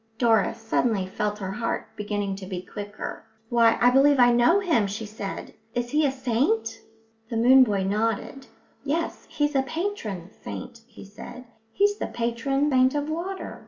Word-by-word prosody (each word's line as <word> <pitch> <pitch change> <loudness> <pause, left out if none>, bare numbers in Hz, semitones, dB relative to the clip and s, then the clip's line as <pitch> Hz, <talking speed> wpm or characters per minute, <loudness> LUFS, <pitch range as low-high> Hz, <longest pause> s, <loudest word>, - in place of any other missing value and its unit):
Doris 225 -2 +2
suddenly 225 -3 0
felt 210 +2 -3
her 190 -2 -5
heart 230 +3 -3
beginning 205 -1 -3
to 190 -1 -8
beat 185 -1 -6
quicker. 205 0 -6 0.3
"Why, 230 -1 +4
I 245 0 +5
believe 280 +2 +5
I 245 -1 +7
know 240 +11 +4
him!" 320 - +2
she 210 +3 -5
said. 210 -2 -7 0.2
"Is 240 0 -2
he 300 0 +3
a - - 0
saint?" 230 -3 0 0.5
The 230 - -2
moon 260 +3 +7
boy 205 -5 0
nodded. 225 +6 -2 0.4
"Yes, 315 +4 -2
he's 295 0 0
a 270 - +3
patron 265 - -4
saint," 240 -2 -7
he 230 -4 -13
said. 210 +5 -11 0.3
"He's 410 - +2
the - - -2
patron 255 +5 -1
saint 260 +1 +4
of 290 +1 -1
water." 365 +4 -5
235 Hz, 165 wpm, -25 LUFS, 210-275 Hz, 0.5 s, I